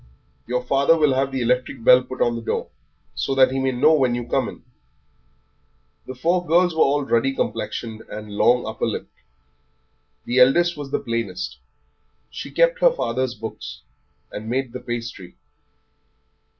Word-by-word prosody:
Your 125 +1 -1
father 140 +5 +3
will 150 -4 +3
have 135 +1 0
the 130 -2 -2
electric 125 0 -1
bell 125 +1 +7
put 130 0 -2
on 120 - 0
the 115 - -5
door, - - -3 0.4
so 135 - -2
that 130 -1 +5
he 135 - -1
may 130 0 +1
know 145 +6 +4
when 130 -5 +2
you 120 -1 -4
come - - 0
in." - - -13 1.4
The 130 - -7
four 175 +7 +1
girls 175 +1 +3
were 160 - 0
all 145 +1 +3
ruddy 135 +1 +1
complexioned 110 -4 -3
and 105 0 -8
long 125 +3 +3
upper 110 0 -2
lipped. - - -5 1.1
The 125 +2 +1
eldest 170 +7 +5
was 145 -2 -7
the - - 0
plainest; 95 - -4 0.7
she - - -7
kept - - +2
her - - +6
father's 130 - -2
books, 105 - -8 0.5
and 110 +2 -7
made 130 0 -2
the - - -5
pastry. 115 -7 -6
130 Hz, 165 wpm, -22 LUFS, 115-140 Hz, 1.4 s, bell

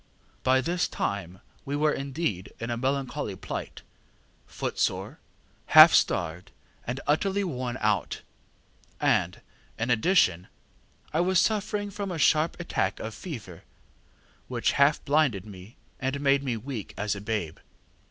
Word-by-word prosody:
By 130 0 +3
this 175 +4 0
time 95 -2 -4 0.2
we 140 - -3
were 150 +1 +2
indeed 135 - -3
in 115 +1 -4
a - - 0
melancholy 135 -2 -2
plight, - - -6 0.6
footsore, - - -2 0.6
half - - +12
starved, 85 +1 +1 0.4
and 125 +2 -2
utterly 195 +7 +1
worn 130 -8 -3
out; 105 -5 0 0.8
and, - - +1 0.4
in 115 +2 -1
addition, 110 - +3 0.7
I 155 - +1
was 185 +2 +2
suffering 205 0 0
from 200 0 -4
a 175 - -3
sharp 155 +2 +2
attack 130 - -1
of 110 - -5
fever, 105 - -8 0.9
which - - 0
half 140 +2 +3
blinded 140 - +2
me 100 +2 -12 0.2
and 135 +2 -2
made 140 -1 +3
me 125 -4 -2
weak 115 -2 -6
as 105 -1 -1
a 100 - -6
babe. 105 -7 -3
130 Hz, 135 wpm, -27 LUFS, 105-155 Hz, 0.9 s, half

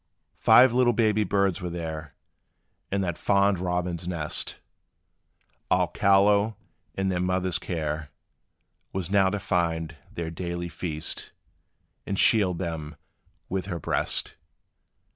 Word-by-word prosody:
Five 120 +2 +7
little 125 -1 +4
baby 110 -1 +2
birds 100 -1 +1
were 90 - -3
there, 80 -4 -6 0.8
In 100 0 +1
that 85 -3 -2
fond 100 -1 +3
robin's 90 -1 -2
nest, 80 -4 -2 1.1
All - - +3
callow; 100 +2 +3 0.4
and 95 0 0
their 90 - -1
mother's 90 -1 0
care 75 -3 -3 0.8
Was 95 -1 -3
now 100 -2 +4
to 105 - -2
find 85 -4 -1 0.2
their 85 -1 -4
daily 85 +1 -4
fare, 80 -1 -5 1.0
And 100 - -2
shield 95 -6 +4
them 80 -4 -4 0.5
with 95 0 -3
her 90 -4 -3
breast. - - -1
90 Hz, 120 wpm, -26 LUFS, 85-100 Hz, 1.1 s, Five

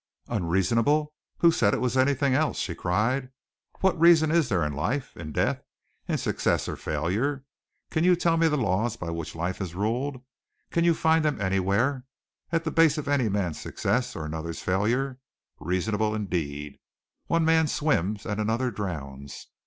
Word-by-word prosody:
"Unreasonable! 115 - +1 0.3
Who 170 - +7
said 105 -10 +2
it - - -2
was 125 0 -1
anything 135 +1 +2
else?" 150 +3 +1
she 90 - -2
cried. 110 +10 0 0.5
"What 190 -3 +2
reason 160 -2 +6
is 165 -5 +2
there 90 -6 +1
in 75 -1 -2
life, 125 - -2
in 80 -2 -7
death, - - 0 0.5
in - - 0
success - - 0
or - - -3
failure? 110 - -2 0.5
Can 160 - +1
you 180 0 +5
tell 170 -1 +2
me 165 0 +3
the 150 -1 +1
laws 110 -1 0
by 85 -1 -5
which 85 -1 -5
life 85 +4 -3
is 90 -3 -5
ruled, 125 +6 -2 0.5
can 170 - +1
you 170 -1 +4
find 160 0 +3
them 150 -2 0
anywhere, 100 +7 +1 0.5
at 165 -1 +1
the 160 - -2
base 165 -2 +4
of 150 - -4
any 140 -6 +2
man's 95 -5 -1
success 125 +5 -1
or 80 - -4
another's 80 +1 -5
failure? 120 +8 0 0.4
Reasonable, 105 +6 0
indeed! 75 -8 -3 0.5
One 165 -1 +2
man 160 -1 +4
swims 105 - 0
and 105 0 -2
another 115 +4 0
drowns. 70 -9 -6
115 Hz, 170 wpm, -26 LUFS, 90-145 Hz, 0.5 s, Who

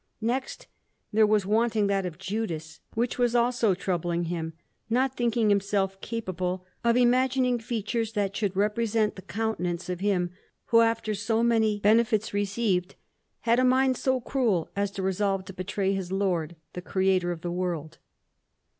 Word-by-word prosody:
Next, 255 +4 -2 0.5
there 215 0 +5
was 210 -2 +2
wanting 220 +1 +2
that 195 -2 +1
of 165 -3 -8
Judas, 180 -5 -4 0.2
which 240 +2 -1
was 245 -1 +2
also 235 -4 +3
troubling 175 -2 -1
him, 165 -1 -3 0.4
not 260 +3 +1
thinking 235 -2 +1
himself 195 -1 +1
capable 185 -5 -3 0.2
of 235 0 +3
imagining 250 0 +3
features 225 0 -2
that 200 -2 -1
should 200 -4 -1
represent 215 +1 +1
the 190 - -9
countenance 185 -5 -3
of 180 -1 -3
him 185 -3 0 0.4
who, 230 0 +6
after 230 -1 +1
so 220 +3 0
many 220 -3 +2
benefits 220 0 +3
received, 200 -2 0 0.5
had 235 +1 +3
a - - +3
mind 260 +1 +4
so 260 +1 +1
cruel 230 -9 0
as 200 0 0
to 195 -1 -5
resolve 190 0 0
to 195 - -9
betray 190 +1 -1
his 190 -2 -3
Lord, 180 -4 0 0.2
the 180 - -5
Creator 185 -1 +1
of 170 -2 -5
the 175 - -3
world. 170 -3 -3
205 Hz, 155 wpm, -27 LUFS, 185-230 Hz, 0.5 s, who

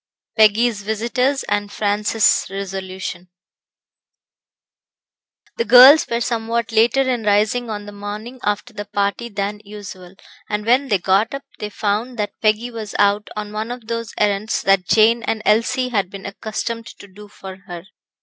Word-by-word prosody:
Peggy's 220 0 +3
Visitors, 240 +6 -1
And 205 0 -2
Francis' 210 +1 +1
Resolution 190 -2 -6 2.3
The 465 - 0
girls 265 +5 +8
were 235 0 -1
somewhat 230 0 -2
later 230 +5 +3
in 255 -3 -1
rising 215 +3 +1
on 205 -1 -5
the 205 - -9
morning 210 +5 -7
after 210 +4 -2
the 205 -1 -6
party 205 +3 -2
than 205 0 -4
usual, 195 -3 -10 0.3
and 210 0 -2
when 255 +4 +3
they 210 -6 +2
got 195 +7 +1
up, 275 - -7 0.2
they 210 - -4
found 215 +4 -2
that 210 -1 -2
Peggy 220 +3 +1
was 220 -3 -7
out 205 +1 +2
on 210 0 -5
one 215 +2 -4
of 245 -2 -7
those 230 -1 -5
errands 210 +1 0
that 195 -2 +2
Jane 230 +2 +4
and 220 -1 -3
Elsie 230 +4 +2
had 200 -6 -1
been 195 0 -10
accustomed 225 +3 -5
to 200 - -13
do 205 +2 -14
for 190 -2 -10
her. 175 -1 -8
210 Hz, 155 wpm, -20 LUFS, 205-235 Hz, 2.3 s, girls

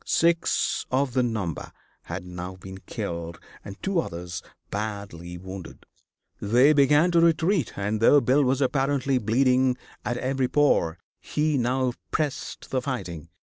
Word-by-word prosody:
Six 170 0 +1
of 130 0 +1
the 130 - +3
number 110 -9 -3 0.3
had 90 +1 -5
now 90 +1 -6
been 95 +1 -10
killed 85 -6 -5 0.2
and 100 -1 -9
two 190 -2 +1
others 85 - -5 0.3
badly 100 -5 -5
wounded. 95 0 -9 0.6
They 125 +8 +5
began 150 +4 +4
to 170 -1 +4
retreat, 165 - +2
and 105 +2 -1
though 145 +5 +7
Bill 140 +2 +3
was 130 +1 +1
apparently 135 0 +1
bleeding 125 +3 +2 0.3
at 120 - -2
every 130 0 0
pore, 125 - +2 0.2
he 150 0 0
now 125 0 +1 0.2
pressed 150 -4 -3
the 130 - +1
fighting. 85 - -5
125 Hz, 140 wpm, -25 LUFS, 95-140 Hz, 0.6 s, though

